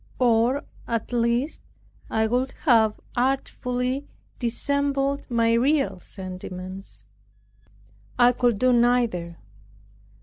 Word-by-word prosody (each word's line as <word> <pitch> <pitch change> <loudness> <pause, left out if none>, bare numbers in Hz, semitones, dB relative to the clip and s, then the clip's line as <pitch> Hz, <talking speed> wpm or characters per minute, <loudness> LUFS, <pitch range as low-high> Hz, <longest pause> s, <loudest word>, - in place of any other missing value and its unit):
Or, 245 +2 +3 0.2
at 230 +1 -2
least, 240 +5 0 0.5
I 220 0 +1
would 250 +4 0
have 225 -6 +4 0.2
artfully 255 +1 -1 0.3
dissembled 280 +3 -1
my 230 -1 +2
real 240 -6 +2
sentiments. 185 - -8 1.1
I 245 0 +6
could 245 -3 +1
do 255 +3 +3
neither. 235 -9 +2
240 Hz, 90 wpm, -25 LUFS, 220-255 Hz, 1.1 s, I